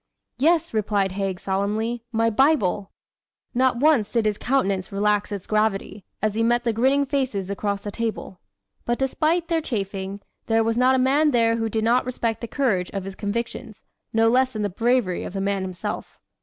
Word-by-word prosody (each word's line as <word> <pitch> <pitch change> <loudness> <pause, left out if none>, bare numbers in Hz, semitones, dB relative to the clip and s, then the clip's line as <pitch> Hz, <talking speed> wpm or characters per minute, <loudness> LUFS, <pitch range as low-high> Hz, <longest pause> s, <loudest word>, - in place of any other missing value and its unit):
"Yes," 320 +1 +2
replied 205 -3 +1
Haig 190 -1 -3
solemnly, 210 +5 -1
"my 225 0 +2
Bible!" 210 - +2 0.6
Not 255 0 +2
once 275 -6 +3
did 230 -2 +1
his 210 -1 0
countenance 200 -8 0
relax 205 +1 +1
its 200 -3 -5
gravity, 215 -2 -1 0.2
as 215 -1 +1
he 225 - -1
met 240 +1 +2
the 230 -2 0
grinning 265 +5 +2
faces 260 -9 -2
across 200 0 -2
the 205 - -5
table. 220 -4 -4 0.4
But 240 0 -1
despite 315 +5 0
their 330 -1 +1
chaffing, 195 -6 -4 0.3
there 225 0 +3
was 225 0 0
not 255 +2 +4
a - - +2
man 275 +4 +3
there 230 -3 +2
who 225 -1 -1
did 220 0 -1
not 240 +3 +3
respect 230 -3 -2
the 235 - -4
courage 215 -9 0
of 195 - -2
his 195 +1 -6
convictions, 215 +1 -5 0.3
no 225 0 +3
less 255 +2 +3
than 215 -1 -2
the 205 - 0
bravery 225 -2 +1
of - - -6
the 195 - -3
man 200 0 0
himself. 185 -1 -5
225 Hz, 185 wpm, -23 LUFS, 200-255 Hz, 0.6 s, not